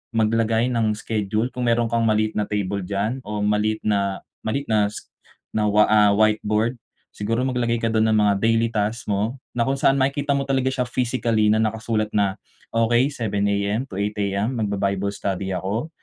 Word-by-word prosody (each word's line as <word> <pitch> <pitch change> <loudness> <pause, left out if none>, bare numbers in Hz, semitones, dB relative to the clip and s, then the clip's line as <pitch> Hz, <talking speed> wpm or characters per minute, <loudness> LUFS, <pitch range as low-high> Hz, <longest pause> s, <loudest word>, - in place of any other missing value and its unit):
maglagay 115 +1 +2
ng 115 -3 +1
schedule, 110 +2 -2
kung 125 -1 -3
meron 115 0 +2
kang 115 -1 +1
maliit 110 0 +1
na 105 - 0
table 100 -2 -2
diyan 105 +6 -1
o 105 0 -3
maliit 105 +1 +1
na 100 -2 0 0.3
maliit 140 +6 -2
na 105 -1 +3
si - - -8 0.5
na, 105 - +2
wa 105 +1 +5
ah, 105 -1 +6
whiteboard, 110 +2 +2 0.4
siguro 115 +4 -1
maglagay 120 -2 0
ka 115 - +3
dun 110 0 +2
ng 110 - +3
mga 105 -1 +4
daily 115 0 +3
task 110 +2 -2
mo, 110 +6 -1 0.2
na 120 - +2
kung 135 - +1
saan 135 - +4
makikita 140 +2 0
mo 140 - 0
talaga 130 -1 +1
siya 130 -1 -1
physically 120 -3 0
na 110 +1 +3
nakasulat 110 0 -1
na, 100 -2 +1 0.4
okay, 120 +2 +3
7:00 105 -5 -1
AM 100 +5 0
to 95 - -9
8:00 105 +1 -1
AM 100 +5 -1
mag-ba-bible 100 -1 -1
study 95 -1 -3
ako. 100 - -3
110 Hz, 185 wpm, -22 LUFS, 105-115 Hz, 0.5 s, ah